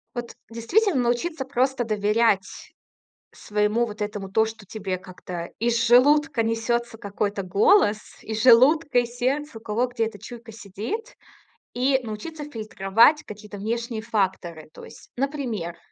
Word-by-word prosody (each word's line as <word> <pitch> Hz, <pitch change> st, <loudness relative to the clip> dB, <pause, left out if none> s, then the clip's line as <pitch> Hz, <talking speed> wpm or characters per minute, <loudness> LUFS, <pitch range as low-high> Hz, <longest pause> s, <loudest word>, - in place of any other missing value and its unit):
Вот 240 Hz, -1 st, -6 dB
действительно 275 Hz, -, +1 dB
научиться 265 Hz, +5 st, -1 dB
просто 265 Hz, -1 st, 0 dB
доверять 210 Hz, -2 st, 0 dB, 0.6 s
своему 210 Hz, +3 st, 0 dB
вот 210 Hz, -2 st, -9 dB
этому, 205 Hz, -2 st, -4 dB
то, 220 Hz, +3 st, +3 dB
что 220 Hz, -2 st, -9 dB
тебе 190 Hz, -2 st, -4 dB
как-то 180 Hz, -2 st, -8 dB
из 235 Hz, 0 st, +1 dB
желудка 285 Hz, +1 st, +4 dB
несется 230 Hz, +1 st, -1 dB
какой-то 205 Hz, -1 st, -3 dB
голос, 210 Hz, -, +4 dB, 0.2 s
из 220 Hz, 0 st, -4 dB
желудка 260 Hz, +3 st, +5 dB
и 245 Hz, -, 0 dB
сердца, 255 Hz, +3 st, -2 dB
у -, -, -12 dB
кого 230 Hz, +3 st, -1 dB
где 235 Hz, -2 st, -1 dB
эта 220 Hz, -2 st, -7 dB
чуйка 230 Hz, +2 st, -10 dB
сидит, 225 Hz, -, -6 dB, 0.6 s
и 265 Hz, +2 st, +2 dB
научиться 240 Hz, +8 st, -7 dB
фильтровать 225 Hz, +2 st, +2 dB
какие-то 210 Hz, 0 st, -10 dB
внешние 230 Hz, +2 st, -3 dB
факторы. 185 Hz, -7 st, -2 dB
То -, -, -12 dB
есть, -, -, -14 dB
например 245 Hz, -, -3 dB
230 Hz, 135 wpm, -24 LUFS, 210-255 Hz, 0.6 s, желудка